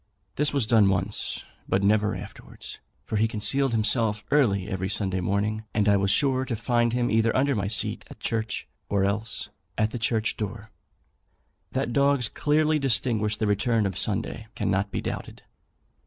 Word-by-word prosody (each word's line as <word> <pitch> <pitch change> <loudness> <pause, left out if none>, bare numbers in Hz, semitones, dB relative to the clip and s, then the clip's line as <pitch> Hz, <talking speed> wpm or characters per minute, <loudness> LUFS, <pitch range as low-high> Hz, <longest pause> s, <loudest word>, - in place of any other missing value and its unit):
This 150 +1 +2
was 140 -5 +1
done 110 -3 +5
once, 95 +2 -1 0.3
but 95 +1 +1
never 105 +1 +3
afterwards; - - -9 0.3
for 110 - -2
he 110 +2 +3
concealed 120 +5 +2
himself 110 -1 +1
early 105 -10 +3
every 95 -2 -2
Sunday 95 -2 +1
morning, 105 +4 -1
and 105 -1 +2
I 100 - +5
was 100 0 +1
sure 130 +2 +2
to 130 -3 -3
find 120 +1 +1
him 120 +1 0
either 115 +1 +2
under 140 +2 +2
my 100 -2 -1
seat 105 +1 -1
at - - -12
church, 110 -1 -2 0.2
or 100 -1 +2
else 105 +2 -2 0.3
at 110 0 +1
the 120 - -4
church 110 -1 0
door. 110 +1 -5 1.0
That 120 - -1
dogs 140 -4 +3
clearly 155 +1 +2
distinguish 110 -5 +1
the 110 - 0
return 105 +2 +1
of 95 -3 -2
Sunday 110 +3 -2
cannot 95 0 0
be - - -3
doubted. - - -6
110 Hz, 170 wpm, -26 LUFS, 100-120 Hz, 1.0 s, done